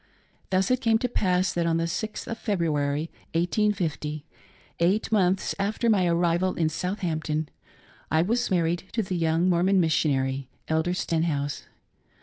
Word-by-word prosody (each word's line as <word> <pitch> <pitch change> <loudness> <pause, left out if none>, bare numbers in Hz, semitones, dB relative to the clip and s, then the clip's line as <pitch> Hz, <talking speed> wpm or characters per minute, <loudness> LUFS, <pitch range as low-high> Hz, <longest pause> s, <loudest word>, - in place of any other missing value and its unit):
Thus 190 +6 +1
it 255 0 +2
came 225 -1 +3
to 250 - -1
pass 185 -5 +1
that 170 -1 0
on 165 0 +2
the 165 - 0
6th 210 +6 -3
of 230 - -5
February, 155 -6 -1 0.2
1850— 170 -5 0 0.6
eight 190 +7 +1
months 190 -3 +2
after 215 +4 +1
my 190 -4 +3
arrival 175 +2 +1
in 160 -2 +1
Southampton 160 -3 -2 0.3
— - - -28
I 160 +2 +4
was 235 +6 0
mar 180 -3 +2
ried 170 +3 -1
to 225 - 0
the 185 -1 -3
young 165 +1 +2
Mormon 185 +2 +3
missionary, 135 -5 +1 0.2
Elder 160 +3 0
Stenhouse. 160 -5 -1
175 Hz, 150 wpm, -26 LUFS, 160-195 Hz, 0.6 s, I